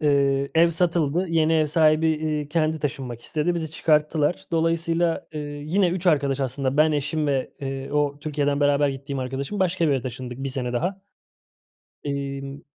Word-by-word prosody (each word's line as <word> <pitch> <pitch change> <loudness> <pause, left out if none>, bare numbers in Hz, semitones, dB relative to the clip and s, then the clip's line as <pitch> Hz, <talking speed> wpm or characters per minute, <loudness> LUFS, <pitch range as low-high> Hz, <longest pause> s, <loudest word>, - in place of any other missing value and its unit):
Eee, 140 -2 +2
ev 165 +1 +5
satıldı. 170 0 +1
Yeni 160 -1 +2
ev 155 -1 +3
sahibi, 155 +1 +3
eee, 155 -2 -1
kendi 160 0 0
taşınmak 135 -5 -4
istedi, 155 +7 -1
bizi 160 -2 -3
çıkarttılar. 155 0 +1
Dolayısıyla, 165 0 +1
eee, 155 - -4
yine 150 +6 0
3 180 +1 -3
arkadaş, 140 -4 +2
aslında 135 +1 -1
ben, 155 +1 +4
eşim 150 +1 -1
ve, 135 -2 -1
eee, 135 0 -5
o 145 -1 +1
Türkiye'den 145 -1 -1
beraber 145 0 +3
gittiğim 135 0 -5
arkadaşım, 135 +9 -4
başka 185 -2 +1
bir - - +2
eve 135 -3 0
taşındık. 125 0 -6
1 135 0 -3
sene 130 -2 -3
daha. 180 +10 -2 1.0
Emm, 140 0 -4
150 Hz, 165 wpm, -24 LUFS, 140-160 Hz, 1.0 s, ev